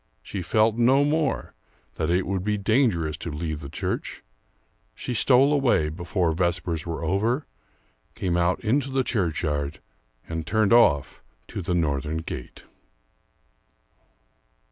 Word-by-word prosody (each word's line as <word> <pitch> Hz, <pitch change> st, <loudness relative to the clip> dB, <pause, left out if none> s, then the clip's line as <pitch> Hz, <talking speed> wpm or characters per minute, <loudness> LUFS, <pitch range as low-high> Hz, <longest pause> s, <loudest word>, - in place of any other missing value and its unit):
She 95 Hz, -, -5 dB
felt 110 Hz, +6 st, +2 dB
no 130 Hz, +4 st, +4 dB
more 150 Hz, -1 st, 0 dB, 0.4 s
that 80 Hz, -, -2 dB
it 90 Hz, +2 st, +2 dB
would 95 Hz, 0 st, -2 dB
be 105 Hz, +1 st, 0 dB
dangerous 100 Hz, -, +1 dB
to 85 Hz, -, -6 dB
leave 80 Hz, 0 st, -4 dB
the 70 Hz, -2 st, -8 dB
church; -, -, -4 dB, 0.7 s
she 125 Hz, -, -4 dB
stole 130 Hz, +5 st, +4 dB
away, 120 Hz, -, +2 dB
before 85 Hz, +1 st, -1 dB
vespers 85 Hz, -1 st, -1 dB
were 85 Hz, 0 st, -4 dB
over, 110 Hz, -, 0 dB, 0.7 s
came 90 Hz, -2 st, -1 dB
out 85 Hz, +1 st, +2 dB
into 135 Hz, +5 st, +1 dB
the 135 Hz, 0 st, +1 dB
churchyard 80 Hz, -, -1 dB, 0.5 s
and 80 Hz, -1 st, -4 dB
turned 110 Hz, -1 st, +2 dB
off 85 Hz, -, +4 dB, 0.3 s
to -, -, -5 dB
the 90 Hz, 0 st, -1 dB
northern 75 Hz, -1 st, 0 dB
gate. 65 Hz, -5 st, -7 dB
90 Hz, 130 wpm, -25 LUFS, 80-115 Hz, 0.7 s, no